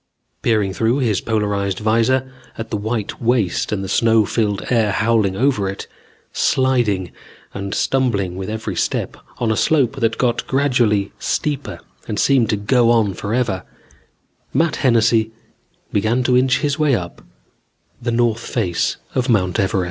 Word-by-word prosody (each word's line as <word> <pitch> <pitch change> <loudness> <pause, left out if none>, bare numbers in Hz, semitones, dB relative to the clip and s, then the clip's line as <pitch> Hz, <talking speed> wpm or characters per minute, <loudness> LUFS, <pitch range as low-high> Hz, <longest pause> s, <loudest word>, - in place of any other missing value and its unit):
Peering 105 -4 +1
through 115 +5 +1
his 115 -8 0
polarized 100 -3 -1
vizor 115 +5 +1 0.3
at 115 - -6
the - - -1
white 110 0 -3
waste 115 -6 0
and 100 -2 -2
the - - -4
snow 110 +2 +3
filled 105 -2 -1
air 110 -4 +2
howling 110 -2 +1
over 120 -6 +1
it, 95 - -6 0.5
sliding 120 -9 +1 0.4
and 100 0 -4
stumbling 105 -9 0
with 95 +1 -5
every 110 -3 -4
step - - -2 0.2
on 115 -2 0
a - - +1
slope 140 0 +2
that 115 -2 0
got 120 -2 0
gradually 120 -7 +1
steeper 145 -2 -2 0.3
and 105 - -3
seemed 130 -5 +3
to 105 - +1
go 115 +3 +2
on 110 -4 +3
forever, 100 -1 -1 0.9
Matt 165 -2 +2
Hennessy 115 -3 +3 0.6
began 110 +5 +1
to 125 0 +2
inch 130 0 +3
his 145 +1 -1
way 150 -4 +3
up 90 -5 -6 0.8
the 120 - -2
north 115 -1 +1
face 95 -8 -1 0.2
of 130 0 -1
Mount 90 -6 +1
Everest. 100 +1 +1
115 Hz, 150 wpm, -19 LUFS, 100-125 Hz, 0.9 s, snow